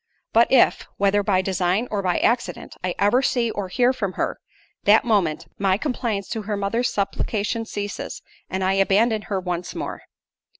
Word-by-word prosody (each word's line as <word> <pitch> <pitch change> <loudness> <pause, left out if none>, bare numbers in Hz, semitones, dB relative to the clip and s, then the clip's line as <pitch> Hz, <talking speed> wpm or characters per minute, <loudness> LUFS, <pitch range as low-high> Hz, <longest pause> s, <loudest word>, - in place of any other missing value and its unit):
But 230 +1 +5
if, 260 -2 +4
whether 200 +1 +3
by 195 -2 +1
design 185 +4 0
or 205 -2 0
by 180 -2 0
accident, 245 +1 -1
I 180 -1 -1
ever 205 +6 +3
see 240 -4 +1
or 205 -3 -4
hear 245 +7 +2
from 200 -7 -3
her, - - -2 0.5
that 215 +4 +6
moment, 195 -9 +1
my 195 -1 +2
compliance 230 -6 -2
to 225 -2 -3
her 205 0 -3
mother's 220 +5 0
supplication 210 +2 -2
ceases, 205 -1 -5 0.3
and 190 0 -2
I 190 +1 +2
abandon 210 +3 +3
her 200 -2 -2
once 180 -1 -4
more." - - -5
205 Hz, 170 wpm, -23 LUFS, 190-230 Hz, 0.5 s, that